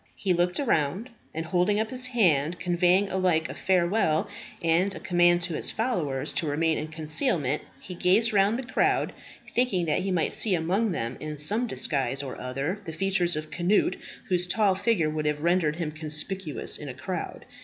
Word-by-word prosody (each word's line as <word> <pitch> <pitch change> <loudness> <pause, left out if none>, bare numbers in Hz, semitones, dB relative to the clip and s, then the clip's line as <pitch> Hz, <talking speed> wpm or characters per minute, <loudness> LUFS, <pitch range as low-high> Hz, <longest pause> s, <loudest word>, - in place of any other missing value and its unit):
He 190 -2 0
looked 175 +1 +1
around, 200 - 0 0.2
and 160 +1 -4
holding 180 +5 +1
up 220 0 -2
his 255 -1 0
hand, 175 - +2
conveying 180 +2 +2
alike 180 -4 +1
a - - -5
farewell 180 -3 +1 0.4
and 175 +4 +2
a - - -6
command 175 -1 +3
to 175 -1 -2
his - - -1
followers 170 - -1
to 160 - -1
remain 160 +2 +1
in 155 - -4
concealment, 155 - 0 0.2
he 180 - -9
gazed 195 +6 +2
round 200 +3 +3
the 265 - -4
crowd, 255 - +1 0.4
thinking 210 -9 +1
that 155 - +1
he 195 - -2
might 175 -4 0
see 205 -5 +1
among 190 +7 0
them 120 -6 -3
in 155 -1 -6
some 210 +12 0
disguise 135 - 0
or 135 - -7
other 135 +10 -3
the 160 - -6
features 180 0 +1
of 155 0 -5
Cnut, 180 +2 +2 0.3
whose 180 -1 +1
tall 205 +1 +3
figure 190 -4 +1
would 155 0 -2
have 150 0 -1
rendered 170 -3 +2
him 165 -3 -3
conspicuous 155 +1 -3
in - - -7
a - - -7
crowd. - - -5
175 Hz, 185 wpm, -27 LUFS, 155-195 Hz, 0.4 s, command